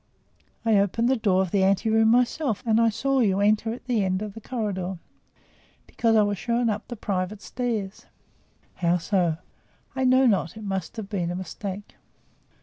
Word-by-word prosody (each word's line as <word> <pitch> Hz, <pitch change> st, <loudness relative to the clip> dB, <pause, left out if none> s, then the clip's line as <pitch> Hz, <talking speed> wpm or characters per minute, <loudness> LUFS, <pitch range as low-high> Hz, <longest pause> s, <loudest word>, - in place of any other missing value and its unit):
"I 225 Hz, -2 st, +4 dB
opened 230 Hz, +5 st, +1 dB
the 265 Hz, -, +3 dB
door 195 Hz, -5 st, +2 dB
of 185 Hz, -, -5 dB
the 195 Hz, -2 st, +2 dB
ante 195 Hz, +2 st, +2 dB
room 220 Hz, 0 st, +4 dB
myself 245 Hz, 0 st, +1 dB
and 225 Hz, 0 st, +3 dB
I 230 Hz, -, +4 dB
saw 270 Hz, +5 st, 0 dB
you 200 Hz, -5 st, +2 dB
enter 215 Hz, +2 st, +2 dB
at 240 Hz, -, -8 dB
the 240 Hz, -5 st, +1 dB
end 185 Hz, +1 st, -1 dB
of 210 Hz, -2 st, -6 dB
the 225 Hz, -, -10 dB
corridor." 195 Hz, -6 st, -3 dB, 0.9 s
"Because 225 Hz, -1 st, +1 dB
I 215 Hz, -, +5 dB
was 205 Hz, -2 st, -1 dB
shown 235 Hz, -1 st, 0 dB
up 210 Hz, +1 st, -5 dB
the 240 Hz, -, -6 dB
private 200 Hz, -1 st, -3 dB
stairs." 225 Hz, -6 st, -4 dB, 0.7 s
"How 175 Hz, -1 st, +2 dB
so?" 175 Hz, -2 st, 0 dB, 0.6 s
"I 265 Hz, -1 st, 0 dB
know 260 Hz, +1 st, +5 dB
not; 195 Hz, -, +1 dB
it 220 Hz, -, -8 dB
must 195 Hz, +1 st, -4 dB
have 215 Hz, -3 st, -5 dB
been 185 Hz, -5 st, -2 dB
a 175 Hz, -, -3 dB
mistake." 190 Hz, +2 st, -7 dB
210 Hz, 185 wpm, -25 LUFS, 190-230 Hz, 0.9 s, I